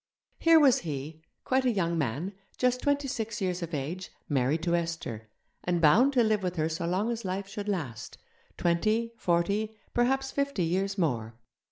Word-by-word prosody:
Here 330 -1 +6
was 275 -5 +5
he, 155 0 -6 0.2
quite 260 0 +2
a 255 - +3
young 170 -5 0
man, 155 - -2 0.2
just 250 0 +1
twenty 285 -1 +1
six 225 -4 -3
years 185 -2 -1
of 170 -1 -4
age, 160 +5 -4 0.2
married 145 +3 +1
to 170 -1 +1
Esther, 160 -11 -4 0.3
and 175 -1 0
bound 220 - +5
to 245 -3 +4
live 215 -2 +2
with 180 -1 -2
her 160 -1 0
so 165 +1 -3
long 195 +7 0
as 235 -1 -4
life 190 +1 -3
should 205 +1 -5
last 145 - -4 0.4
twenty, 215 +7 +1
forty, 205 +4 0 0.2
perhaps 265 +2 +1
fifty 280 -9 0
years 190 +4 0
more. 120 - -1
185 Hz, 175 wpm, -29 LUFS, 165-230 Hz, 0.4 s, Here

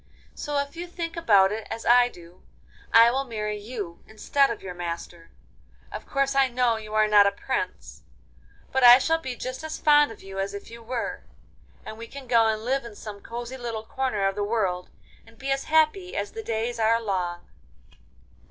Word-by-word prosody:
So, 295 -1 -3
if 280 +2 -2
you 350 +1 -6
think 340 -1 -5
about 205 - +4
it 215 0 -5
as 225 - -6
I 245 0 +6
do, 175 -3 -16 0.5
I 230 +1 +7
will 270 +2 0
marry 210 -4 -4
you 205 -6 -7
instead 275 +6 +1
of 230 - -5
your 185 -2 -6
master. 170 -1 -6 0.6
Of - - -8
course 275 0 0
I 270 -1 +4
know 245 -2 +1
you 215 -1 -7
are 215 0 +4
not 205 -1 +6
a - - +2
prince, 200 - -4 0.7
but 265 -1 +1
I 245 0 +11
shall 325 +5 +1
be 260 -5 -5
just 255 +4 -6
as 315 0 -5
fond 295 -3 +4
of 225 - -13
you 195 0 -7
as 195 +1 -2
if 200 - -9
you 235 0 -10
were, 235 +1 -4 0.6
and 220 - -8
we 230 - -7
can 275 +1 -10
go 230 -2 +4
and 220 0 -1
live 270 +2 0
in 235 -3 -10
some 205 -1 -9
cosy 240 +2 -7
little 230 -3 -5
corner 235 -6 -1
of 195 - 0
the 205 +1 -2
world, 195 -5 -1 0.4
and 225 0 -19
be 270 +2 -4
as 270 0 -1
happy 320 +4 +2
as - - -3
the 445 - -6
days 230 - -3
are 225 +1 +3
long. 180 -5 -3
230 Hz, 200 wpm, -25 LUFS, 205-265 Hz, 0.7 s, I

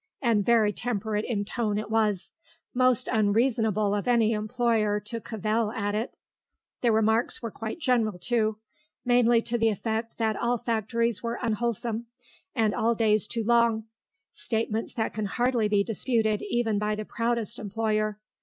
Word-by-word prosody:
And 230 -6 +2
very 220 -2 +3
temperate 215 -1 -2
in 205 -4 -2
tone 215 -2 -1
it 215 0 -4
was; 215 -4 +1 0.4
most 255 0 +3
unreasonable 215 -2 +2
of 205 +3 -2
any 230 -3 +3
employer 215 -1 +1
to 230 +3 -6
cavil 215 0 -1
at 205 -3 -2
it. 220 +4 -3 0.7
The 240 - +3
remarks 220 +2 +1
were 230 - -3
quite 220 +5 -5
general, 240 - +1
too; 220 +2 0 0.5
mainly 240 -1 +4
to 240 0 -1
the 225 0 +4
effect 220 +2 -3
that 220 -2 0
all 240 +1 0
factories 230 -1 -1
were 235 0 -3
unwholesome, 235 0 -2 0.5
and 220 -3 +2
all 230 +1 +1
days 215 -2 +2
too 230 +1 -2
long; 235 -1 +3 0.5
statements 225 -1 -2
that 220 - -1
can 215 -1 -2
hardly 240 +1 +1
be 205 -1 +2
disputed 220 -1 0
even 225 - +1
by 210 0 0
the 215 0 -5
proudest 230 -1 -1
employer. 215 0 -1
225 Hz, 155 wpm, -27 LUFS, 215-235 Hz, 0.7 s, mainly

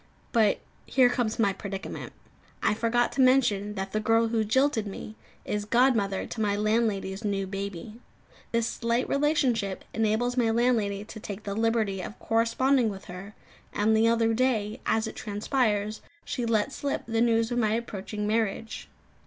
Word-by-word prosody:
But 220 -4 +3 0.3
here 255 -2 +4
comes 235 -3 -1
my 200 -4 +2
predicament. 195 -1 -6 0.5
I - - +3
forgot 230 +2 +1
to 270 - 0
mention 215 -6 +3
that 195 0 -4
the 215 - 0
girl 225 +1 +2
who 225 -1 +1
jilted 235 0 +2
me 200 +2 -7 0.3
is 210 0 -2
godmother 225 -4 +2
to 225 - -5
my 205 -1 +1
landlady's 210 -2 0
new 200 -2 -1
baby. 195 +2 -6 0.5
This 230 -1 +1
slight 235 +1 -1
relationship 260 -9 +1
enables 225 +3 0
my 235 -2 +3
landlady 225 -4 +1
to 220 - -9
take 205 0 -7
the 200 - -4
liberty 220 -3 0
of 210 - -7
corresponding 230 +2 +2
with 195 -2 -8
her; 185 +3 -9 0.4
and 215 +2 +2
the 220 +1 +4
other 230 0 +3
day, 225 -4 0
as 225 0 +2
it 220 - -6
transpires, 210 0 -1 0.2
she 245 -2 -2
let 225 +3 +1
slip 280 0 -2
the 225 0 0
news 230 0 +2
of 240 - 0
my 215 -2 +2
approaching 210 -2 -4
marriage. 220 0 -2
220 Hz, 160 wpm, -27 LUFS, 205-235 Hz, 0.5 s, here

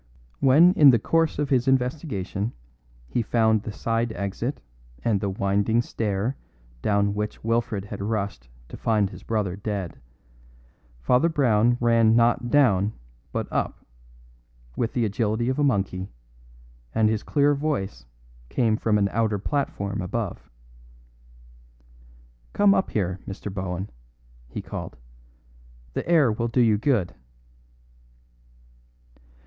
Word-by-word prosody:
When 155 +7 +6
in 145 -5 +7
the 120 - +6
course 165 +8 +1
of 145 -1 -2
his 130 -1 +2
investigation 125 - -1 0.5
he 120 - -1
found 110 -2 +2
the 110 - -6
side 115 +2 -1
exit 100 +7 -3 0.4
and 105 -4 +1
the 100 - -1
winding 100 +4 +1
stair 110 +4 -2 0.4
down 100 - +1
which 105 0 -4
Wilfred 115 -3 -1
had 100 -1 -7
rushed 100 - -3 0.2
to - - -8
find 105 -3 +1
his - - -11
brother 105 -5 -2
dead, 100 -3 -4 1.0
Father 125 - +3
Brown 120 -6 +3
ran 115 -2 +4
not 120 +1 +2
down 110 -7 +3 0.4
but - - -3
up, - - -2 0.9
with 115 - -1
the 120 -2 +1
agility 110 +3 0
of 130 - -1
a - - +3
monkey, 95 -7 0 0.9
and 110 - +4
his 110 -1 0
clear 145 0 +2
voice 100 - -3 0.4
came 115 -4 +1
from 110 -2 +1
an 100 -1 +2
outer 110 -2 +1
platform 100 -5 -2
above. 95 +2 -4 2.0
"Come 205 -1 +5
up 190 - +1
here, 95 -3 -1
Mr. 95 0 -6
Bohun," 95 0 -4 0.6
he - - -6
called. - - -7 1.0
"The - - -4
air 155 -8 +5
will 115 +2 -1
do 120 +2 +1
you 110 -3 +3
good." 110 - +1
110 Hz, 125 wpm, -25 LUFS, 100-125 Hz, 2.0 s, in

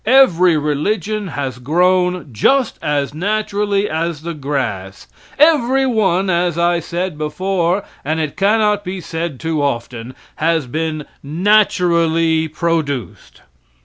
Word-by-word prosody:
Every 185 -10 +5
religion 200 +8 -1
has 135 -6 -4
grown 180 +4 +1
just 255 - +1
as 145 -1 -1
naturally 205 +2 -1
as 160 -2 -3
the 170 0 -4
grass; 125 -10 -4 0.3
every 270 -3 +4
one, 195 -6 +1
as 175 -2 0
I 170 0 +2
said 170 -1 -4
before, 180 +4 -1 0.2
and 155 +3 -1
it 155 -2 -3
cannot 210 0 +2
be 185 0 -5
said 165 -5 -5
too 160 -2 -1
often, 120 -2 -3 0.2
has 160 -2 +1
been 155 +3 -3 0.2
naturally 165 -2 +2
produced. 155 -5 -3
170 Hz, 115 wpm, -17 LUFS, 150-195 Hz, 0.3 s, Every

